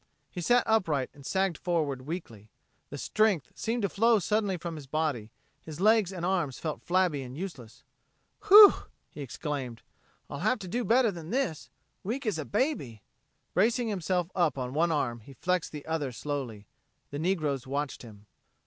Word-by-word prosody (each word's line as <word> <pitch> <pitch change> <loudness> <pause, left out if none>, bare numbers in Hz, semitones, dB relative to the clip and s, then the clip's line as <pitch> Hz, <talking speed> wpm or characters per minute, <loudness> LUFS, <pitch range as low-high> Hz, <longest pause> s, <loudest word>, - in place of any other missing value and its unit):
He 180 - -5
sat 245 +7 +4
upright 165 - +1
and 140 - -15
sagged 190 +1 0
forward 150 -7 -1
weakly. 115 - -7 0.4
The 145 - -7
strength 200 - +1
seemed 230 0 -2
to 200 - +1
flow 230 +4 +4
suddenly 205 -1 0
from 170 -1 -6
his 145 -3 -9
body; 145 -7 -1 0.3
his 155 -1 -9
legs 215 -1 +4
and 175 -2 -4
arms 175 -8 0
felt 155 -2 -4
flabby 175 -5 +1
and 130 +1 -8
useless. 135 - -8 0.6
"Whew!" 410 +1 +11 0.4
he 150 - -9
exclaimed. 135 -3 -5 0.4
"I'll 140 - -6
have 255 - +1
to 190 - -8
do 240 +7 -2
better 235 0 +3
than 170 -3 -9
this. 165 - -2 0.3
Weak 245 +7 -3
as 210 -8 -1
a 155 - -4
baby!" 205 - -2 0.5
Bracing 230 +5 +2
himself 180 -2 -1
on 140 -8 0
one 165 +3 +2
arm, 120 -6 -1
he 125 +5 -14
flexed 180 +5 -1
the 150 -2 -8
other 155 -4 -2
slowly. 120 -4 -5 0.5
The 145 - -4
negroes 155 -7 -1
watched 140 +1 -3
him. 105 -3 -13
160 Hz, 165 wpm, -29 LUFS, 140-195 Hz, 0.6 s, Whew